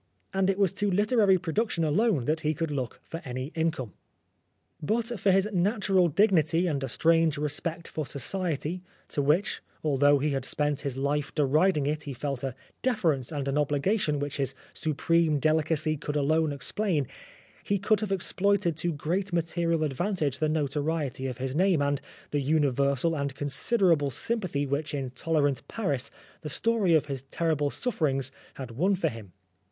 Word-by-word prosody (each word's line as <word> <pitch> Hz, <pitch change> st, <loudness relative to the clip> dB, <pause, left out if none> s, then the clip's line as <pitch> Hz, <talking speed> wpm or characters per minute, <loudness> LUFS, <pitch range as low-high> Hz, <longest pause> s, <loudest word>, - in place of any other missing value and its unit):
And 195 Hz, 0 st, +2 dB
it 195 Hz, -, +1 dB
was 195 Hz, -2 st, +2 dB
to 205 Hz, 0 st, 0 dB
literary 205 Hz, 0 st, +4 dB
production 180 Hz, +1 st, -1 dB
alone 160 Hz, -, +2 dB
that 155 Hz, +3 st, +1 dB
he 155 Hz, +1 st, 0 dB
could 165 Hz, +1 st, -2 dB
look 130 Hz, -5 st, -3 dB
for 165 Hz, -, -7 dB
any 130 Hz, +1 st, -5 dB
income. 160 Hz, -, -2 dB, 0.9 s
But 230 Hz, +6 st, -1 dB
for 195 Hz, -, +2 dB
his 195 Hz, +1 st, +4 dB
natural 190 Hz, -1 st, +2 dB
dignity 170 Hz, -1 st, +3 dB
and 145 Hz, -6 st, -1 dB
a -, -, -1 dB
strange 165 Hz, +3 st, +3 dB
respect 160 Hz, +3 st, -3 dB
for 155 Hz, -3 st, -4 dB
Society, 170 Hz, +3 st, -2 dB, 0.3 s
to 145 Hz, -, 0 dB
which, 155 Hz, +9 st, +1 dB, 0.2 s
although 145 Hz, -1 st, +4 dB
he 145 Hz, +2 st, 0 dB
had 135 Hz, -2 st, -1 dB
spent 145 Hz, +1 st, -1 dB
his 135 Hz, -2 st, -3 dB
life 140 Hz, +1 st, -1 dB
deriding 150 Hz, +2 st, +3 dB
it, 150 Hz, +1 st, -1 dB
he 140 Hz, -3 st, -6 dB
felt 140 Hz, 0 st, -3 dB
a 135 Hz, -2 st, -3 dB, 0.3 s
deference 165 Hz, -, 0 dB
and 145 Hz, -3 st, -3 dB
an 140 Hz, +2 st, +1 dB
obligation 150 Hz, +3 st, +1 dB
which 145 Hz, 0 st, -3 dB
his 135 Hz, -2 st, -2 dB, 0.2 s
supreme 160 Hz, 0 st, +1 dB
delicacy 155 Hz, +1 st, +1 dB
could 150 Hz, +1 st, -4 dB
alone 155 Hz, +2 st, +2 dB
explain, 155 Hz, +2 st, 0 dB, 0.6 s
he 200 Hz, -, +1 dB
could 210 Hz, +2 st, +2 dB
have 215 Hz, -2 st, -3 dB
exploited 195 Hz, -1 st, +1 dB
to 175 Hz, +2 st, 0 dB
great 175 Hz, +6 st, -2 dB
material 170 Hz, -1 st, 0 dB
advantage 150 Hz, -1 st, -1 dB
the 155 Hz, -, +1 dB
notoriety 145 Hz, -2 st, -1 dB
of 125 Hz, -2 st, -5 dB
his 130 Hz, +1 st, -3 dB
name, 185 Hz, -1 st, +3 dB
and 145 Hz, -1 st, 0 dB, 0.3 s
the 145 Hz, -, 0 dB
universal 140 Hz, +1 st, +2 dB
and 140 Hz, -2 st, -2 dB
considerable 145 Hz, -, +1 dB
sympathy 160 Hz, -, -2 dB
which 145 Hz, +2 st, -2 dB
in 135 Hz, -3 st, -3 dB
tolerant 145 Hz, 0 st, 0 dB
Paris 145 Hz, -, -2 dB, 0.3 s
the 150 Hz, -, -5 dB
story 210 Hz, -1 st, +2 dB
of 155 Hz, -, +3 dB
his 135 Hz, -3 st, -4 dB
terrible 155 Hz, -3 st, 0 dB
sufferings 140 Hz, -, -1 dB, 0.2 s
had 130 Hz, -3 st, -7 dB
won 180 Hz, -, +2 dB
for 185 Hz, -, 0 dB
him. 110 Hz, -6 st, -10 dB
155 Hz, 165 wpm, -28 LUFS, 140-180 Hz, 0.9 s, literary